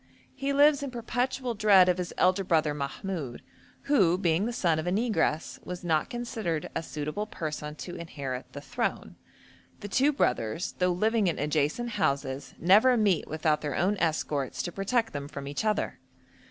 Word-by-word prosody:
He 275 +1 -2
lives 285 0 +5
in 280 - -3
perpetual 245 +1 -2
dread 205 -4 +6
of 180 0 +2
his 180 - -3
elder 185 +2 +3
brother 160 -4 +2
Mahmoud, 145 -1 -5 0.4
who, 195 - +3
being 180 +2 +1
the - - -2
son 170 -9 +1
of 160 - -4
a - - +1
negress, 205 -7 0
was 180 0 -6
not 160 -3 +1
considered 220 -10 -3
a - - 0
suitable 155 +6 -4
person 150 -5 -5
to 175 +3 -7
inherit 135 -6 -6
the 145 - -7
throne. 245 +8 -3 0.7
The 205 - -5
two 265 +8 +3
brothers, 125 - 0
though 180 0 +3
living 215 +3 +2
in 170 - 0
adjacent 150 - 0
houses, 140 - -2
never 215 +8 +5
meet 200 -7 +2
without 155 0 0
their 145 -2 -3
own 195 +4 +2
escorts 155 -5 -1
to 175 - -4
protect 225 +5 0
them 140 -1 -4
from 140 -2 -7
each 140 +7 -3
other. 215 -1 -1
180 Hz, 170 wpm, -28 LUFS, 150-220 Hz, 0.7 s, dread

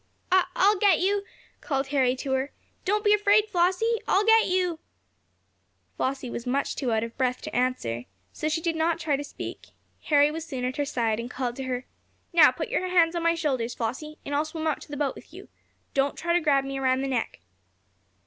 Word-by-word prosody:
"I 370 -1 +4
I'll 410 +2 +4
get 390 -5 +5
you!" 400 +2 +1 0.4
called 270 -3 -2
Harry 260 -3 +2
to 265 +1 -5
her. 265 +2 0 0.3
"Don't 420 +2 +1
be 415 -1 +5
afraid, 415 0 +4
Flossie! 375 +6 +2
I'll 400 +2 +3
get 450 0 +5
you!" 360 -3 0 1.2
Flossie 265 0 -2
was 235 - -5
too - - -3
much 280 +3 -1
out 225 -3 +1
of 230 0 -6
breath 255 -1 +1
to - - -6
answer, 235 - -1 0.3
so 310 - -2
she 315 +1 -1
did 330 -1 -1
not 325 +1 +1
try 315 -4 0
to 285 - -4
speak. 285 - -8 0.4
Harry 290 -1 +4
was 325 +1 -5
soon 265 -6 -4
at 255 +1 -3
her 290 - 0
side, 230 -6 0
and 235 +1 -5
called 250 -2 -3
to 265 - -4
her: 255 0 -3 0.5
"Now 340 - +8
put - - -4
your 405 -6 -1
hands 345 -2 +3
on 340 - -1
my 335 0 +2
shoulders, 260 -8 -1
Flossie, 300 +7 -4
and 285 - -4
I'll 290 +1 +2
swim 315 0 -4
to - - -14
the 290 - -5
boat 285 -1 0
with - - -14
you. - - -11 0.4
Don't 275 0 +1
try 340 0 -1
to 350 - +4
grab 280 -3 +3
me 270 0 -4
around 260 0 +1
the 275 - -1
neck." 255 -4 -2
290 Hz, 215 wpm, -26 LUFS, 260-345 Hz, 1.2 s, Now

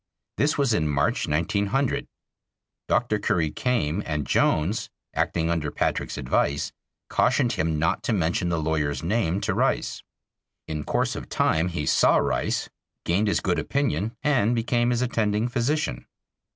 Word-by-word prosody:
This 150 +2 +2
was 140 -5 +2
in 80 -7 +1
March, 70 -1 +1
1900. 100 - 0 0.8
Dr. - - +1
Curry 80 -3 +1
came, 105 -9 0
and 75 -2 -2
Jones, 90 +9 +1 0.2
acting 85 0 0
under 80 -3 -1
Patrick's - - -2
advice, 70 +3 0 0.4
cautioned 120 - +2
him 80 -7 0
not 80 +4 +1
to - - 0
mention 90 -2 0
the 85 - 0
lawyer's 75 -3 -1
name 95 -1 0
to - - 0
Rice. - - 0 0.7
In 75 -1 -4
course - - 0
of - - -7
time 80 +2 +2
he 85 -4 -3
saw - - +4
Rice, - - 0 0.4
gained 100 +6 +2
his 100 - +1
good 90 -2 0
opinion 120 -5 -1
and 125 -6 +2
became 120 +1 +1
his 120 0 +1
attending 110 -2 0
physician. 120 - -1
95 Hz, 145 wpm, -25 LUFS, 80-120 Hz, 0.8 s, saw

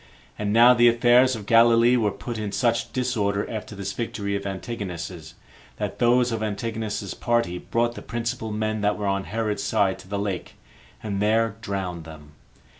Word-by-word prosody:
And 105 -1 -1
now 120 +3 +7
the 120 -1 +5
affairs 120 +2 +5
of 105 -2 -8
Galilee 115 +2 +5
were 110 -4 +2
put 115 +3 -6
in 105 -2 -3
such 115 +1 0
disorder 105 -6 -1
after 110 -1 -6
this 100 0 -4
victory 100 -3 -3
of 100 0 -3
Antigonus's, 90 -5 -6 0.4
that - - -4
those 120 +1 +3
of 115 -1 -2
Antigonus's 110 -2 -3
party 115 -7 0
brought 120 +4 0
the - - -9
principal 115 -1 -4
men 110 0 -2
that 105 0 +1
were 105 - -3
on 100 -1 0
Herod's 110 -1 -2
side 95 -2 +1
to - - -14
the 100 +1 -3
lake, 100 -3 -4 0.5
and 100 -2 -2
there 110 0 +2
drowned 95 -6 -4
them. 75 -2 -12
110 Hz, 175 wpm, -24 LUFS, 100-115 Hz, 0.5 s, now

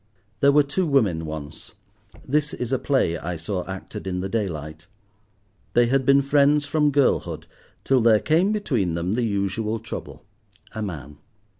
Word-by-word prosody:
There 140 - +5
were 145 +1 +5
two 165 +6 -1
women 100 - +1
once. 75 -1 -8 0.5
This 150 +2 0
is 125 0 -4
a 130 - +1
play 105 - +1
I 90 +2 -4
saw 90 +3 -3
acted 95 0 -7
in 90 -1 -2
the 95 +1 -3
daylight. 80 -7 -4 0.9
They 120 - +5
had 130 +2 +1
been 140 0 +5
friends 145 +1 +3
from 150 0 +2
girlhood, 140 -1 +1 0.4
till 135 -2 +3
there 110 -2 +5
came 170 - +2
between 125 - -1
them 85 +2 -2
the 125 - 0
usual 105 +1 -1
trouble—a 110 -1 -10
man. 75 -8 -6
110 Hz, 155 wpm, -23 LUFS, 90-140 Hz, 0.9 s, There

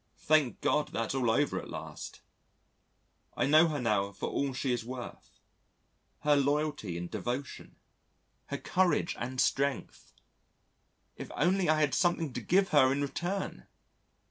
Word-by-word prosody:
Thank 155 -5 +2
God 150 0 +1
that's 115 +1 -2
all 130 -3 +1
over 145 +6 +1
at - - -11
last. - - -8 1.2
I - - +2
know 155 +4 +6
her 150 -3 -2
now 105 -5 +1
for - - -4
all 140 -1 -1
she 130 0 -1
is 120 - -2
worth 125 +1 -9 0.8
her 150 0 +4
loyalty 145 - 0
and 85 0 -4
devotion, 125 +9 -5 0.7
her - - -3
courage 180 -2 +1
and 130 +2 -4
strength. 140 +1 -1 1.0
If - - -7
only 180 +2 +2
I 155 0 +4
had 145 -2 +2
something 170 -6 +1
to - - -4
give 190 +2 +2
her 130 -3 +5
in 140 +1 0
return! 175 +8 -4
140 Hz, 145 wpm, -30 LUFS, 125-155 Hz, 1.2 s, know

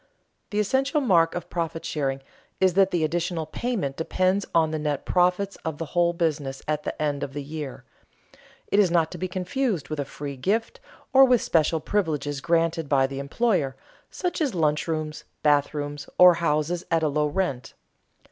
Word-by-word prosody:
_ - - -37 0.5
The 205 - -4
essential 265 +8 +1
mark 170 - +3
of 175 - -4
profit 165 -1 -3
sharing 135 -3 -2 0.4
is 185 -1 +3
that 195 +1 +4
the 175 -4 0
additional 170 +1 -1
payment 170 - -3
depends 185 +4 0
on 160 -2 +3
the 155 - -2
net 150 -2 -2
profits 180 +2 +1
of 160 -2 -5
the 165 - -4
whole 175 -1 +3
business 150 -6 -2
at 150 -1 0
the - - -5
end 145 -2 -1
of 135 - -4
the 145 0 -4
year. 150 -2 -7 0.9
It 200 - +3
is 195 -3 +5
not 165 -2 +2
to - - -7
be 185 - -2
confused 185 - -2
with 155 -1 -4
a - - +1
free 140 -1 -7
gift, 225 - -1 0.3
or 270 0 +8
with 250 -3 +4
special 160 0 +2
privileges 150 -7 -1
granted 165 -2 +1
by 135 -2 +4
the 135 0 -5
employer, 140 - 0 0.3
such 355 -3 -3
as 275 -9 0
lunch 150 -2 +1
rooms, 155 -1 -3 0.2
bathrooms 145 0 0
or 180 -1 +9
houses 165 +1 0
at 165 -1 +2
a - - +3
low 150 +1 +1
rent. 145 -5 -2
165 Hz, 185 wpm, -25 LUFS, 150-185 Hz, 0.9 s, or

